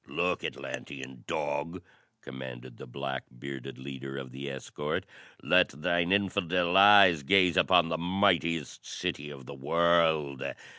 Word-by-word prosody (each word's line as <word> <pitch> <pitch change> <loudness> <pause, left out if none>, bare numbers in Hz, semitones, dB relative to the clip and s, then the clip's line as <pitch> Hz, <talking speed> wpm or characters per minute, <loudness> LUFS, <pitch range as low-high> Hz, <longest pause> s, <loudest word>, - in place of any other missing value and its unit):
"Look, 90 0 -1
Atlantean 65 -3 -7
dog!" 75 +5 -3 0.4
commanded 65 -2 -9
the - - -10
black 65 +1 -5
bearded 70 +1 -8
leader 70 0 -7
of 65 -2 -7
the 70 +2 -6
escort. 75 +2 -4 0.4
"Let - - +4
thine 85 +5 -1
infidel 90 -3 +1
eyes 100 -5 +7
gaze 90 +3 +3
upon 90 -3 +4
the 80 -1 -2
mightiest 85 -4 0
city 75 +1 -4
of 70 -3 -11
the 70 - -9
world. 80 -1 +1
75 Hz, 130 wpm, -29 LUFS, 65-85 Hz, 0.4 s, eyes